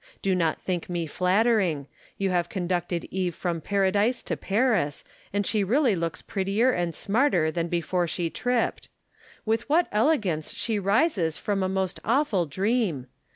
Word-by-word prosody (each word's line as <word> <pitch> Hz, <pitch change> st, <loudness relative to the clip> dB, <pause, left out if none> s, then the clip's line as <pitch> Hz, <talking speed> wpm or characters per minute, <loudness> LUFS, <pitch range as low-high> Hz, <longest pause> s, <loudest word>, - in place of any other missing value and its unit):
Do 195 Hz, -, +2 dB
not 165 Hz, -3 st, +1 dB
think 180 Hz, -2 st, -3 dB
me 175 Hz, -2 st, -2 dB
flattering. 180 Hz, -, +2 dB, 0.3 s
You 195 Hz, -1 st, 0 dB
have 175 Hz, -1 st, 0 dB
conducted 175 Hz, -2 st, -2 dB
Eve 185 Hz, -2 st, -1 dB
from 170 Hz, -3 st, -2 dB
Paradise 200 Hz, +6 st, +1 dB
to -, -, -2 dB
Paris, 200 Hz, -, 0 dB, 0.3 s
and 205 Hz, 0 st, 0 dB
she 210 Hz, 0 st, +1 dB
really 240 Hz, +2 st, +3 dB
looks 165 Hz, -1 st, -3 dB
prettier 200 Hz, +6 st, +1 dB
and 175 Hz, -6 st, -2 dB
smarter 200 Hz, -, +2 dB
than 170 Hz, 0 st, -2 dB
before 175 Hz, +1 st, 0 dB
she 165 Hz, 0 st, -2 dB
tripped. 245 Hz, -1 st, -1 dB, 0.6 s
With 225 Hz, +3 st, -1 dB
what 335 Hz, +4 st, +4 dB
elegance 210 Hz, -, +1 dB
slie 220 Hz, -3 st, -2 dB
rises 200 Hz, -, +2 dB
from 200 Hz, -2 st, -1 dB
a 185 Hz, -, 0 dB
most 190 Hz, -1 st, -2 dB
awful 225 Hz, -, +1 dB
dream 190 Hz, -, 0 dB
190 Hz, 155 wpm, -26 LUFS, 175-220 Hz, 0.6 s, what